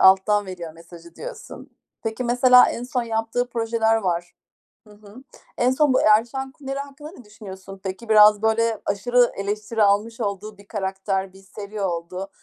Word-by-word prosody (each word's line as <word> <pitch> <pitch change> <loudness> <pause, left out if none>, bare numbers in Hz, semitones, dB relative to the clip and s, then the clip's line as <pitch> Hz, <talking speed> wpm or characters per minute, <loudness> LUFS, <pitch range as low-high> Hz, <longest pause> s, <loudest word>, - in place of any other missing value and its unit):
alttan 195 +2 +4
veriyor 175 -3 -7
mesajı 170 +1 -15
diyorsun. - - -10 0.3
Peki 225 +2 -3
mesela 250 +1 +6
en 235 - -5
son 250 0 -2
yaptığı 225 +2 -2
projeler 225 -1 +1
var 175 -4 -2 0.5
Hı 210 - -16
hı. 210 +4 -15 0.3
En 250 +1 +2
son 285 0 +2
bu - - +3
"Erşan 235 +5 +2
Kuneri" 270 0 -6
hakkında 285 +2 -9
ne 295 - -14
düşünüyorsun 195 -2 -11
peki? 195 +4 -6
Biraz, 210 -1 +7
böyle, 220 0 +1
aşırı 240 +4 +2
eleştiri 210 +2 -1
almış 210 +4 +1
olduğu 205 0 -4
bir 200 0 -18
karakter, 190 -1 -3
bir 190 - -16
seri 205 +2 -8
oldu. 180 +1 -4
215 Hz, 160 wpm, -22 LUFS, 195-240 Hz, 0.5 s, Biraz